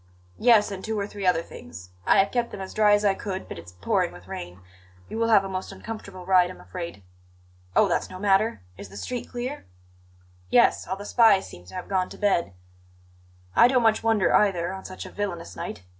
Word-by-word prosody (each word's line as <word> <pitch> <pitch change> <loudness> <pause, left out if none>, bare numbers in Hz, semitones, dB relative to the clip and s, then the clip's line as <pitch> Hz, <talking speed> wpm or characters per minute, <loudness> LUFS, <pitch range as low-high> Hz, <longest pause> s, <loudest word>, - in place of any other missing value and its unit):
"Yes; 225 -4 +5
and 190 -1 -6
two 220 -1 -2
or 200 - -1
three 200 -2 -4
other 165 -2 +3
things. 85 - -11 0.2
I - - +5
have 195 +1 +3
kept 240 -1 0
them - - -8
as 190 0 -7
dry 210 -1 +4
as 205 0 +3
I 200 - +4
could, 195 -1 -5
but - - -7
it's 85 +1 -12
pouring 90 -1 0
with 90 +1 -14
rain. 90 0 -7 0.5
You 225 - -5
will 230 - +2
have 215 -3 +5
a - - -4
most 190 -1 -5
uncomfortable 200 -5 -8
ride, 180 -1 +4
I'm 185 - -10
afraid." 170 - -7 0.7
"Oh, - - +5
that's - - -1
no 185 - -8
matter. 195 - +2 0.2
Is 100 - -9
the 100 - -11
street 245 - -5
clear?" 250 +4 -5 0.8
"Yes; - - +4
all 190 - -2
the 200 +1 -9
spies 220 -4 +5
seem 90 - -13
to - - -12
have 180 - -6
gone 185 -2 0
to - - -10
bed. 190 - +1 1.0
I - - +8
don't 250 -1 +2
much 225 -1 +3
wonder 220 -5 +2
either, 185 -3 +2
on 190 - -8
such 185 - -8
a - - -9
villainous 175 - -4
night. 90 - -6
195 Hz, 220 wpm, -25 LUFS, 170-215 Hz, 1.0 s, I